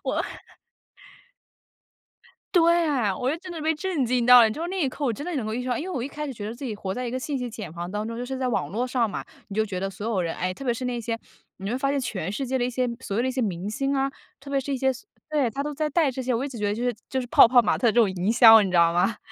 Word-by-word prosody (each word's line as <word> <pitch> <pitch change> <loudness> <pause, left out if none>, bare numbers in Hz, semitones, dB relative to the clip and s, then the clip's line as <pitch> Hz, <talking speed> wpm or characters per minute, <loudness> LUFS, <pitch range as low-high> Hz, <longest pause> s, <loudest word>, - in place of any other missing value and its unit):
我 - - -1 2.3
对 340 -1 +4
啊， 240 -9 +1
我 255 - -1
就 305 - 0
真 365 +1 -9
的 330 - -6
被 315 +1 +1
震 320 -5 -1
惊 245 0 +1
到 250 0 +9
了。 225 - +7
你 215 - -3
知 320 - -6
道 - - -1
那 375 0 -2
一 275 - +2
刻 285 +3 -6
我 250 - +2
真 285 +7 -6
的 350 - -3
能 240 -6 -2
够 215 - -3
意 250 - -2
识 255 - -6
到， 245 - 0
因 - - -4
为 375 - -5
我 260 -10 -3
一 255 - -3
开 300 +1 -6
始 275 - -5
觉 205 -2 -7
得 225 - -6
自 275 - -10
己 235 -5 -3
活 195 -2 -4
在 250 0 -4
一 235 - -3
个 255 - -2
信 280 +1 -3
息 250 -1 -4
茧 215 -7 -7
房 175 +1 -5
当 210 +1 -3
中。 230 - -5
就 245 - -4
是 265 +1 -4
在 260 -1 -1
网 245 - -1
络 240 +5 -2
上 240 -3 +1
嘛， - - -5 0.2
你 200 - -7
就 220 0 +2
觉 190 -3 -5
得 195 +1 -2
所 205 +3 -6
有 215 -5 0
人， 165 -1 -2
哎， 185 0 -2
特 275 - -10
别 240 -2 +1
是 250 +2 -5
那 245 -1 -2
些， 230 0 -3 0.4
你 195 +1 -5
会 250 - -1
发 275 +1 0
现 285 - 0
全 195 -7 -3
世 265 +4 -3
界 260 - 0
的 245 - 0
一 250 - 0
些 250 0 -1
所 200 -3 -3
谓 - - +2
的 255 - 0
一 - - 0
些 255 0 -2
明 195 -2 -2
星 275 +5 -1
啊， 270 0 +1 0.3
特 275 +1 -11
别 280 - 0
是 275 +1 -2
一 - - -1
些 265 +1 +2 0.4
对， 290 -6 +1
他 275 +6 -4
都 295 +1 -3
在 305 +1 -1
带 305 -1 +2
这 260 0 -4
些。 250 0 0
我 250 +4 -1
一 - - -3
直 255 - -8
觉 210 - -2
得 205 - +1
就 230 - -5
是 245 -2 0
就 260 - -1
是 245 - -5
泡 - - +8
泡 245 +1 +6
玛 - - +1
特 240 - +2
这 240 - +3
种 220 -4 +5
营 185 +3 -1
销， 225 -2 +9
你 195 - -1
知 180 - +2
道 170 0 +5
吗？ 195 +5 +1
245 Hz, 365 characters per minute, -25 LUFS, 215-275 Hz, 2.3 s, 到